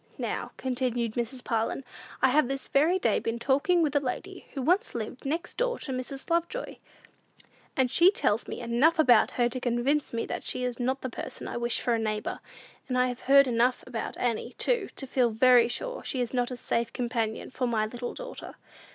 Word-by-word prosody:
"Now," - - -3
continued 245 -3 -1
Mrs. 245 +2 -3
Parlin, 230 +3 -1 0.4
"I - - +7
have 290 0 +3
this 275 +1 -3
very 315 +7 +3
day 375 - +2
been 230 +1 -2
talking 285 +8 +2
with 295 -1 0
a - - +6
lady, 360 +8 -5
who 270 - -2
once 365 - +2
lived 235 +3 -5
next 330 +5 -3
door - - 0
to 270 - -6
Mrs. 260 +1 -4
Lovejoy; 340 +9 -1 1.0
and 260 -2 +2
she 345 +6 +7
tells 435 +5 0
me - - -5
enough 240 +8 +3
about 255 -6 +5
her 240 -1 +4
to 255 +2 -4
convince 250 +4 0
me 230 - -2
that - - -4
she 250 - -3
is 250 -1 -2
not 260 +2 -1
a - - -1
person - - -6
I - - -4
wish 240 0 -1
for 240 - +1
a 230 - +1
neighbor. 215 -1 -2 0.5
And 255 - -1
I 250 0 +3
have 245 0 -5
heard 275 0 +8
enough 245 0 +1
about 235 -3 -5
Annie, 235 -3 -2
too, 475 -6 0
to 270 - -4
feel 255 -2 +2
very 240 +1 +5
sure - - -4
she 265 - -3
is 245 0 -2
not 245 -1 +1
a 250 - -5
safe 235 -1 -1
companion 235 -3 -2
for 255 -1 -1
my 220 -2 +1
little 240 +2 -5
daughter." - - -8
255 Hz, 205 wpm, -28 LUFS, 240-285 Hz, 1.0 s, heard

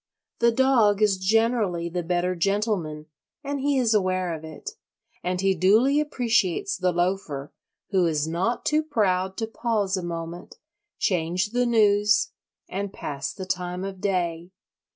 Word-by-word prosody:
The 235 - +4
dog 230 -5 +3
is 195 -3 +3
generally 210 -3 +1
the 175 +1 -3
better 175 +1 0
gentleman, 180 -4 -1 0.4
and 285 0 -3
he 280 0 +1
is 235 -3 +2
aware 185 -3 +1
of 160 -1 -7
it; 160 - -8 0.5
and 180 0 -1
he 195 0 +2
duly 220 - +4
appreciates 335 - 0
the 180 -1 +1
loafer, 175 -5 -2 0.4
who 185 -3 +3
is 155 -1 0
not 185 +9 -1
too 305 0 +3
proud 190 -10 0
to 225 - -1
pause 220 -4 -1
a 185 - -4
moment, 170 0 -6 0.4
change 180 +2 0
the 245 +1 +1
news, 210 -2 +3 0.4
and 195 +1 -4
pass 140 -7 -5
the 190 - -7
time 180 0 -3
of 195 -1 -6
day. 175 -3 -1
195 Hz, 150 wpm, -25 LUFS, 175-225 Hz, 0.5 s, The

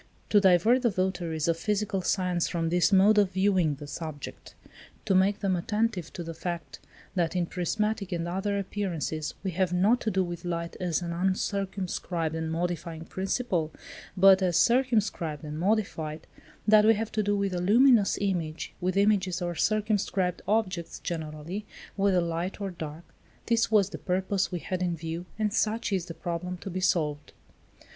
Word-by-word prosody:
To 205 - +6
divert 195 +7 +5
the 240 - +3
votaries 175 -5 -1
of 165 -1 +2
physical 205 +1 -1
science 180 -2 0
from 165 -2 -1
this 175 +3 +3
mode 205 +2 +6
of 200 -2 +3
viewing 190 -5 +2
the 145 +1 -9
subject; 150 -1 -7 0.5
to - - +2
make 195 +2 +3
them 195 -3 +1
attentive 210 -1 -1
to 175 - -5
the 165 0 -6
fact, 165 -5 -5 0.3
that 175 -2 0
in 180 -1 +1
prismatic 200 +3 -2
and 170 -1 -2
other 195 +3 -1
appearances 170 -6 -3
we 190 - -1
have 185 0 0
not 200 +8 +3
to 220 - 0
do 190 -2 +1
with 175 -1 -6
light 170 -1 -3
as 175 -1 -1
an 170 - -3
uncircumscribed 185 -2 -2
and 160 0 -3
modifying 165 -1 -3
principle, 190 -4 -1 0.5
but 190 +1 +7
as 180 -3 +2
circumscribed 215 - +2
and 150 0 -5
modified; 170 -6 -1 0.4
that 210 0 +7
we 220 +1 +6
have 220 +1 -3
to 215 - 0
do 205 0 +1
with 200 -1 -1
a 175 - -1
luminous 225 +2 +5
image; 170 -5 -2
with 185 +1 0
images 200 -3 +2
or 175 -1 -2
circumscribed 205 -2 0
objects 185 -6 -1
generally, 160 +4 -5 0.3
whether 195 -2 +3
light 170 +3 -3
or 200 -2 -3
dark: 160 -1 -7 0.4
this 230 -1 +2
was 205 -3 +3
the - - -6
purpose 190 +2 0
we 180 - -2
had 185 +2 -4
in 175 -2 0
view, 165 +2 -5
and 215 -2 0
such 220 -1 0
is 185 -2 -1
the 165 - -7
problem 180 +1 -4
to 190 - -7
be 185 - -3
solved. 150 -5 0
185 Hz, 170 wpm, -28 LUFS, 170-200 Hz, 0.5 s, but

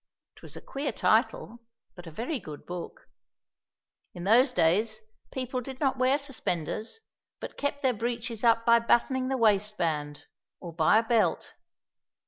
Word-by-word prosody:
It - - -18
was - - -10
a - - -9
queer 275 +2 -4
title, 360 - +1 0.3
but 175 -2 -12
a - - -8
very 245 - -3
good 150 -7 -10
book. 175 -1 -7 1.1
In 175 - -7
those 245 +7 +5
days 215 +3 +1 0.3
people 255 -1 -3
did 265 +1 -8
not 275 -3 +1
wear 260 +2 +3
suspenders, 230 - -4 0.4
but - - -8
kept 285 0 -3
their 260 -1 +3
breeches 235 0 -4
up 230 -1 +3
by 235 0 +6
buttoning 255 +3 +1
the 265 0 -1
waistband, 190 -10 0 0.4
or 170 -2 -8
by 165 +6 +4
a 225 - +3
belt. 225 -1 +1
230 Hz, 150 wpm, -28 LUFS, 185-260 Hz, 1.1 s, by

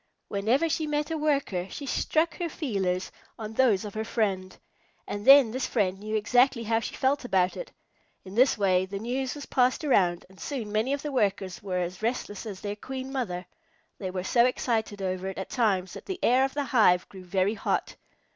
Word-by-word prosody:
Whenever 225 +11 +1
she 315 -1 -1
met 295 +1 -1
a - - 0
Worker, 275 -12 0
she 285 - -7
struck 315 +5 0
her 345 -1 -1
feelers 190 - -2 0.3
on 220 -1 -6
those 220 -5 +3
of 205 - -7
her 220 - -2
friend, 195 -5 -1 0.5
and 205 +3 -5
then 270 -4 +9
this 260 +2 -2
friend 195 -5 0
knew 215 +1 -4
exactly 245 +3 +3
how 225 0 +1
she - - -6
felt 270 +2 +1
about 185 -6 +1
it. - - -7 0.5
In 190 - -9
this 255 +4 +4
way 190 -2 +2
the 195 +1 -5
news 250 +5 -2
was 290 - -7
passed 255 +3 +2
around, 180 - +2
and 190 +1 -19
soon 240 -8 -4
many 215 +5 +1
of 280 0 -2
the 295 - -3
Workers 195 -6 -1
were 190 -2 -3
as 180 +1 -3
restless 225 -2 -3
as 195 -3 -7
their 205 0 -3
Queen 260 +4 -6
Mother. 185 -10 -3 0.5
They 190 - -3
were 185 0 -4
so 235 +5 +4
excited 220 -5 -1
over 185 0 -2
it 190 - -5
at 190 - -5
times 195 -7 +1
that - - -10
the 380 - -3
air 255 +2 +4
of 270 - -5
the 290 - 0
hive 210 -9 +3
grew 190 -2 -11
very 190 +3 +1
hot. 215 - -2
220 Hz, 205 wpm, -27 LUFS, 190-265 Hz, 0.5 s, then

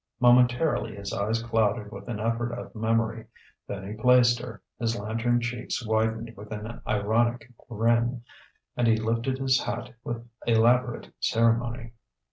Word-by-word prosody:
Momentarily 120 -1 +3
his 100 -1 -6
eyes 110 +3 -1
clouded 110 -2 0
with 100 +1 -9
an 115 -4 -4
effort 115 +2 -1
of - - -7
memory; 115 0 -1 0.4
then 95 -1 -5
he 105 - -5
placed 120 +1 +4
her, 120 -4 -8 0.2
his 115 -2 0
lantern 115 +3 0
cheeks 120 0 -3
widened 110 +1 0
with 105 +2 -11
an 110 +2 -6
ironic 115 +3 0 0.2
grin, 115 +2 +1 0.5
and 120 - +1
he 110 -1 +4
lifted 115 +4 -1
his 130 -1 +2
hat 125 - -4
with 120 0 -5 0.2
elaborate 120 +2 +2
ceremony. 115 0 +1
115 Hz, 140 wpm, -27 LUFS, 110-120 Hz, 0.5 s, placed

